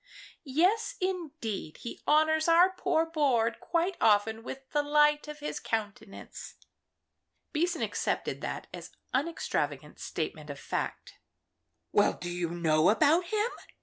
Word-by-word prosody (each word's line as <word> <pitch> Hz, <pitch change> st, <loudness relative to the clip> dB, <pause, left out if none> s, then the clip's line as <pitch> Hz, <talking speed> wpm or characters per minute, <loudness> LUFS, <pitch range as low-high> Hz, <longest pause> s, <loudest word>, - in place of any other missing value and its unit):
"Yes, 370 Hz, -, +1 dB
indeed; 305 Hz, -, -3 dB
he 235 Hz, -, -8 dB
honours 315 Hz, +1 st, +4 dB
our 345 Hz, +3 st, +6 dB
poor 325 Hz, -3 st, +1 dB
board 270 Hz, -8 st, +1 dB
quite 345 Hz, +2 st, -1 dB
often 220 Hz, +1 st, +3 dB
with 265 Hz, +3 st, -8 dB
the 295 Hz, -, +2 dB
light 295 Hz, +1 st, +3 dB
of 300 Hz, 0 st, -8 dB
his 300 Hz, -, -3 dB
countenance." 210 Hz, -2 st, -5 dB, 1.0 s
Beason 340 Hz, +2 st, 0 dB
accepted -, -, -2 dB
that -, -, -4 dB
as -, -, -8 dB, 0.2 s
unextravagant 150 Hz, -, -2 dB
statement 155 Hz, -2 st, -4 dB
of 140 Hz, -, -6 dB
fact. -, -, -4 dB, 0.7 s
"Well, 205 Hz, -, +4 dB
do 175 Hz, -, -6 dB
you 175 Hz, -1 st, -2 dB
know 165 Hz, -1 st, +3 dB
about 310 Hz, -, +4 dB
him?" 430 Hz, +6 st, 0 dB
295 Hz, 125 wpm, -30 LUFS, 205-330 Hz, 1.0 s, our